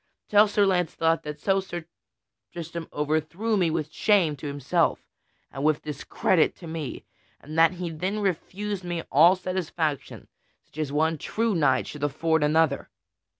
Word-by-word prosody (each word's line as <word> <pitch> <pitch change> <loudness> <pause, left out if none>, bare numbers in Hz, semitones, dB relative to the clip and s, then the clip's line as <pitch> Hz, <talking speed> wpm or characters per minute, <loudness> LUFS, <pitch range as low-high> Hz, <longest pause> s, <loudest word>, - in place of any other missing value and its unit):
Tell 210 +1 +6
Sir 205 0 +2
Launcelot 165 -3 +1
that 150 0 -7
so 195 +4 +2
Sir 175 -3 -6 0.7
Tristram 170 0 -6
overthrew 155 +9 -1
me 180 -5 +2
with 155 -1 -2
shame 185 -8 +3
to 145 - -6
himself 145 +4 0 0.5
and 135 - -5
with 155 0 +2
discredit 155 +3 +1
to 175 - -12
me, 160 -3 -6 0.3
and 155 +2 -10
that 165 +1 +5
he 175 -2 -5
then 185 +6 -3
refused 195 +1 -3
me 175 -2 -3
all 165 +7 +7
satisfaction 170 -6 -3 0.4
such 155 - -13
as 150 -3 -2
one 160 +1 +1
true 225 +6 -1
knight 145 -7 +2
should 150 -1 -8
afford 160 +2 +1
another." 155 -1 +2
165 Hz, 150 wpm, -26 LUFS, 150-185 Hz, 0.7 s, all